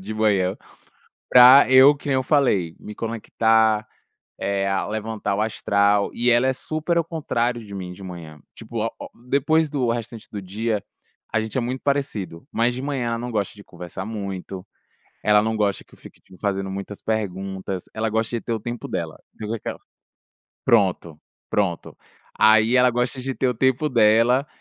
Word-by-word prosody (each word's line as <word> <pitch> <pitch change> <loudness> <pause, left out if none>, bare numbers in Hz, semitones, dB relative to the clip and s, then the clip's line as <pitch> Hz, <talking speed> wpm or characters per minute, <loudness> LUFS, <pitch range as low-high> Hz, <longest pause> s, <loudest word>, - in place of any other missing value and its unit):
de 105 +3 -6
manhã, 100 -4 +1 0.7
pra 125 +3 +9
eu 130 +3 +8
que 140 - -11
nem 135 - +2
eu 130 - +1
falei, 115 - +1
me 105 - -9
conectar, 110 -1 +1 0.5
eh 100 0 -1
a 95 -1 0
levantar 105 -1 -3
o 105 - -1
astral. 100 -2 +1
E 120 +1 +1
ela 120 +2 +4
é 130 - +2
super 155 +5 -2
ao 170 - +3
contrário 125 -8 -2
de 100 -1 -11
mim 90 -2 -6
de 95 - -12
manhã. 85 -5 -9 0.2
Tipo - - -4
o - - 0
o - - -8 0.2
depois, 155 +4 +2
do 130 -5 -1
restante 115 -1 -4
do 100 -2 -5
dia 105 +2 -2 0.5
a 110 - +2
gente 110 +3 -4
é - - +1
muito 125 +2 -3
parecido, 130 -12 -2
mas 120 +2 +1
de 130 - -5
manhã 135 -4 -2
ela 115 - -1
não 120 +1 -5
gosta 105 -3 -2
de 100 -1 -14
conversar 90 +2 -8
muito, 100 -3 -6 0.6
ela 105 0 +5
não 110 0 -1
gosta 105 -2 0
que - - -28
eu - - -16
fique, - - -15
tipo, 95 - -18
fazendo 95 -1 -2
muitas 100 +1 -7
perguntas, 95 -3 -3
ela 110 0 -1
gosta 110 +2 -1
de - - -6
ter 115 - -6
o 110 - -2
tempo 120 +2 -6
dela, 85 -3 -4 0.2
fica 110 +1 -4
aquela 110 - -6 0.9
Pronto, 90 -8 +2 0.3
pronto, 95 -5 -1 0.4
aí 110 +2 +5
ela 125 0 +5
gosta 125 +2 -2
de 135 0 -4
ter 130 - 0
o 125 - +1
tempo 130 +5 +1
dela. 115 +4 +4
110 Hz, 185 wpm, -23 LUFS, 100-125 Hz, 0.9 s, pra